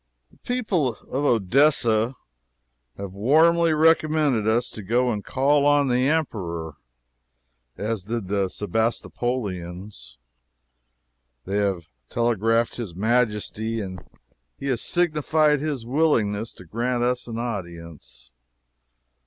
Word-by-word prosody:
The - - -24
people 190 - -1
of 135 +7 -4
Odessa 120 0 +3 0.8
have 100 -1 -6
warmly 160 +10 +4
recommended 155 -6 +3
us 120 +2 +1
to 110 - -7
go 120 +5 +1
and 105 -3 -3
call 140 +2 +2
on 145 -1 +3
the 125 +2 +2
Emperor, 85 - -2 1.0
as 105 0 -2
did 115 -2 -3
the 100 0 0
Sebastopolians. 100 - -3 1.3
They 100 +2 -2
have 95 -5 0 0.2
telegraphed 115 0 +1
his 105 -9 -6
Majesty, 110 +1 0
and 95 -3 -6 0.5
he - - -8
has 125 -3 0
signified 155 -3 +2
his 145 -5 -3
willingness 115 -6 +1
to 90 - -14
grant 120 +6 -1
us 125 0 -1
an 115 -1 -5
audience. 85 - -7
115 Hz, 110 wpm, -24 LUFS, 100-140 Hz, 1.3 s, warmly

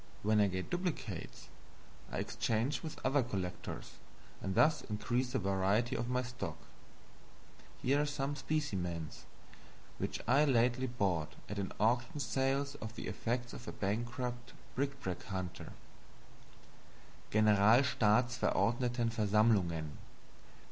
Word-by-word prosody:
When 105 0 +4
I 100 - +5
get 95 -1 -4
duplicates, 175 - -3 0.6
I - - -3
exchange 120 +5 0
with 160 - -6
other 135 +2 +4
collectors, 95 -7 -5 0.4
and 95 -1 -2
thus 155 0 +5
increase 120 +4 -1
the - - +2
variety 100 +4 +1
of 120 - -2
my 125 0 +1
stock. 125 0 -5 1.3
Here 140 +3 +3
are 150 - 0
some 145 0 -2
specimens 95 - -2 0.7
which - - -2
I 135 +5 +5
lately 125 -1 +3
bought 95 -10 0
at 105 - -4
an 95 - -2
auction 120 +5 +2
sale 135 0 +1 0.2
of 110 +1 -6
the - - -5
effects 120 +1 -2
of 120 - -9
a - - -3
bankrupt 120 +4 -3 0.2
bric 140 +1 0
a - - -19
brac 95 -10 -4
hunter: 95 -3 -5 1.6
Generalstaatsverordnetenversammlungen. 110 - +3
120 Hz, 115 wpm, -34 LUFS, 100-130 Hz, 1.6 s, I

